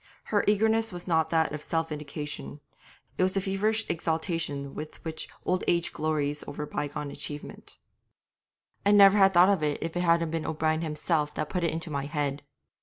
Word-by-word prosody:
Her 205 - +1
eagerness 220 +2 +3
was 175 0 -7
not 160 -2 +2
that 160 -1 +2
of 150 0 -5
self 165 +1 -1
vindication; 145 - -6 0.6
it - - +3
was 185 0 +2
the 195 - +2
feverish 210 +3 0
exaltation 160 -4 -2
with 155 +1 -7
which 160 -1 -4 0.2
old 185 0 +1
age 170 -1 +1
glories 150 -1 -1
over 150 - -5
bygone 150 0 -4
achievement. 145 +1 -7 1.1
'I'd 205 +1 +5
never 200 0 +8
have 195 0 +6
thought 180 +2 +7
of 200 -5 +2
it 150 -1 0
if 165 +1 -4
it 175 - 0
hadn't 170 -2 +3
been 165 -1 -2
O'Brien 155 0 0
himself 150 -1 -1
that 155 - -2
put 180 -2 -2
it 170 - +3
into 160 0 -4
my 140 -1 -2
head. 145 -1 -2
160 Hz, 180 wpm, -28 LUFS, 150-185 Hz, 1.1 s, never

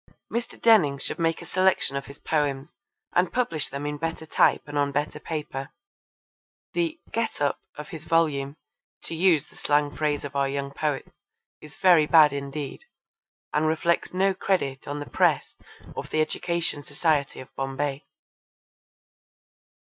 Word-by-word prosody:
Mr. 235 0 -3
Denning 190 -12 +5
should 140 - -4
make 165 -1 0
a - - -10
selection 185 -6 +2
of 140 - -3
his 140 - -10
poems 145 -2 -1 0.4
and 180 0 +3
publish 165 - 0
them 140 +1 -5
in 145 0 -3
better 165 0 -3
type - - +3
and 145 - -8
on 145 -1 +2
better 145 +1 -2
paper. 150 -4 -5 1.0
The 335 -2 -1
'get 230 0 -1
up' 145 -1 +1 0.2
of 150 +5 -7
his 160 -4 -8
volume, 150 -3 +1 0.5
to - - -6
use 165 -3 +3
the - - -21
slang 145 0 +1
phrase 150 -2 0
of 140 0 -7
our 140 -1 +2
young 140 0 -3
poets, 145 -2 -2 0.5
is 150 -1 -13
very 170 -5 +5
bad 155 -3 +7
indeed, 140 - -5 0.7
and 155 +1 +2
reflects 160 +2 +1
no 190 +1 +2
credit 180 -9 -1
on 145 +1 -3
the 145 - -5
press - - +1 0.4
of - - -5
the 155 - 0
Education 170 0 -1
Society 145 -1 0
of 130 - -11
Bombay. 135 +1 -3
150 Hz, 155 wpm, -26 LUFS, 140-165 Hz, 1.0 s, bad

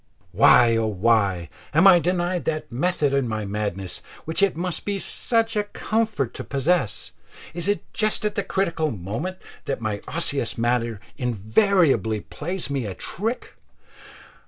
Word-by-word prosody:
Why, 120 -2 +6
oh 110 -1 +1
why, 100 -4 +1 0.3
am 165 +5 +5
I 185 -3 +8
denied 175 +1 -1
that 155 -3 -3
method 145 +2 0
in 140 -3 +1
my 110 -2 -3
madness 100 -2 -3 0.2
which 160 +4 -1
it 200 -5 +2
must 180 0 -3
be 205 -1 -2
such 225 +3 +2
a 210 -1 +1
comfort 215 - -1
to - - -6
possess? 140 - 0 0.4
It 175 +2 -3
is 205 - +2 0.2
just 215 0 +1
at 210 - 0
the 200 - -1
critical 170 -6 0
moment 115 - -4 0.3
that 140 - -2
my 110 -2 -3
osseous 145 -7 -1
matter 115 -2 0 0.2
invariably 125 - +2
plays 175 +4 -4
me 135 -6 -2
a 95 - -6
trick. 225 +7 -4
145 Hz, 150 wpm, -23 LUFS, 110-185 Hz, 0.4 s, I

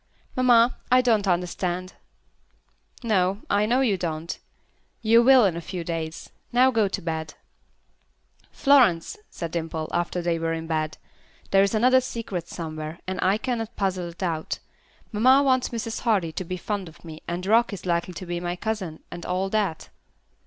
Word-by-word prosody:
"Mamma, 245 -1 +4
I 255 0 +7
don't 220 -5 +2
understand." 180 0 -1 1.1
"No. 195 -2 +1
I 205 +1 +3
know 250 +4 +3
you 215 -7 +2
don't. 165 -1 -4 0.6
You 230 +1 +6
will 255 -1 +7
in 180 -4 +1
a 170 - -4
few 175 +1 -5
days. 165 -1 -5 0.2
Now 255 +2 +5
go 220 -4 +2
to 195 - -4
bed." 160 -2 -4 1.2
"Florence," 250 - +4
said 170 -2 -6
Dimple, 160 -2 -3
after 175 +1 -1
they 170 -1 0
were 165 0 -1
in 165 0 -4
bed. 155 -1 -2 0.5
"There 195 - +6
is 200 +3 +2
another 255 +4 +5
secret 205 -9 -5
somewhere, 155 -1 -6
and 185 0 -4
I 190 +3 +3
cannot 230 -1 -3
puzzle 185 -3 -1
it 170 +3 -8
out. 160 -3 -2 0.5
Mamma 255 +6 +5
wants 260 -2 +2
Mrs. 225 -1 -4
Hardy 200 -9 +1
to 170 - -4
be 185 +1 -5
fond 195 -1 -4
of 160 - -18
me, 160 -1 -9
and 175 +2 -3
Rock 230 +4 +4
is 200 - -7
likely 170 0 -1
to 185 - -6
be 175 0 -3
my 175 0 -3
cousin, 190 -5 -4
and 175 - -7
all 185 +2 -1
that." 200 -7 -1
185 Hz, 170 wpm, -25 LUFS, 170-225 Hz, 1.2 s, I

